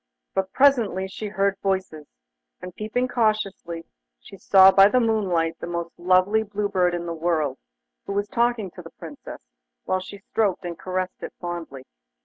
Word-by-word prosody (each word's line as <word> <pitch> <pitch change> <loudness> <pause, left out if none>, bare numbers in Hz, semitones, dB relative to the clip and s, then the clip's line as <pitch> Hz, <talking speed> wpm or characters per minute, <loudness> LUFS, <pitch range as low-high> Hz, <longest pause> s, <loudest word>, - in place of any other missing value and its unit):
But 190 0 -1
presently 235 -9 +3
she 210 +3 -6
heard 200 -1 0
voices, 190 -6 -2 0.5
and 180 0 -9
peeping 220 +4 -1
cautiously, 215 -8 -1 0.3
she - - -13
saw 190 0 +6
by 195 0 +7
the 255 - +3
moonlight 185 -8 0
the - - -6
most 170 -1 -4
lovely 185 +4 +3
blue 210 -1 -3
bird 180 -3 +2
in 175 0 -4
the 170 - -3
world, 160 -5 -1 0.5
who - - -3
was 205 +1 -1
talking 235 -5 0
to 180 - -10
the 165 - -11
Princess, 160 -4 -10 0.4
while 185 - 0
she 195 +2 -9
stroked 200 -2 -1
and 175 -1 -4
caressed 185 0 -3
it - - -7
fondly. 170 -7 -6
190 Hz, 165 wpm, -24 LUFS, 175-210 Hz, 0.5 s, by